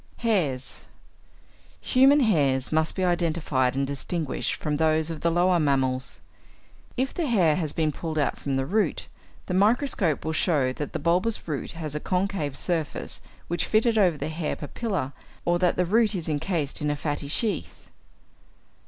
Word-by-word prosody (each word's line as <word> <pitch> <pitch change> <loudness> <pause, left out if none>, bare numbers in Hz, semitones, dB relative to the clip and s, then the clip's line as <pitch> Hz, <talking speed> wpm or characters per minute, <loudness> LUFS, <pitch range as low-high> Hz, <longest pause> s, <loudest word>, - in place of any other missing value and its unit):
=Hairs.= 155 - -1 0.9
Human 275 +3 +5
hairs 140 - +2
must 160 0 +1
be 185 - -1
identified 160 -7 +1
and 135 0 +1
distinguished 140 +2 -2
from 150 -1 -2
those 160 +1 +2
of 160 - -6
the 170 - +2
lower 175 +1 +3
mammals. 130 -3 0 0.8
If 265 +2 0
the 335 -4 -1
hair 180 - +3
has 160 -5 -1
been 155 -1 0
pulled 160 +1 -5
out 145 - 0
from 140 -1 -2
the 135 0 0
root, 210 +8 0 0.4
the 185 - -3
microscope 200 - +2
will 160 - -1
show 145 -6 +1
that 145 +1 -5
the - - -1
bulbous 180 +8 0
root 150 -4 -4
has 160 -3 -5
a 150 - -2
concave 180 -6 -1
surface 165 -4 -2 0.3
which 175 +1 -1
fitted 225 +1 +3
over 180 -6 +3
the 145 +2 -3
hair 160 -1 -3
papilla, 165 - -3 0.3
or 175 0 +2
that 180 -1 +2
the 180 - +2
root 215 +3 +2
is 170 -3 -3
encased 155 -1 -1
in 150 - 0
a 145 - 0
fatty 145 -1 -3
sheath. 200 +3 -1
160 Hz, 165 wpm, -26 LUFS, 145-185 Hz, 0.9 s, Human